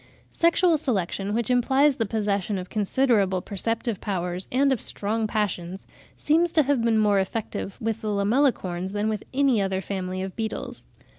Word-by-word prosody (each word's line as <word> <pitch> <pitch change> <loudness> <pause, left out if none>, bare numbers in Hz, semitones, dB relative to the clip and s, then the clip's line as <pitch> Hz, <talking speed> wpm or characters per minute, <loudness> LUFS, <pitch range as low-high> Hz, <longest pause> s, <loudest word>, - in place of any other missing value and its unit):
Sexual 335 -1 +3
selection, 200 - -2
which 235 +1 0
implies 265 +3 +3
the 225 - -1
possession 205 -2 -1
of 180 0 -7
considerable 210 -3 +2
perceptive 225 +3 -2
powers 180 -2 -3
and 270 +2 +3
of 245 - -3
strong 215 +2 -1
passions, 190 -4 -3 0.3
seems 330 +3 +2
to 310 - +5
have 280 -2 +1
been 230 -1 +2
more 205 -2 +3
effective 195 0 -4
with 225 0 -2
the 215 - -4
Lamellicorns 200 -4 0
than 210 +1 0
with 215 -1 -2
any 265 -5 +2
other 190 -1 -1
family 185 -1 -4
of 190 -1 -6
beetles. 220 -1 -5
215 Hz, 160 wpm, -25 LUFS, 195-250 Hz, 0.3 s, to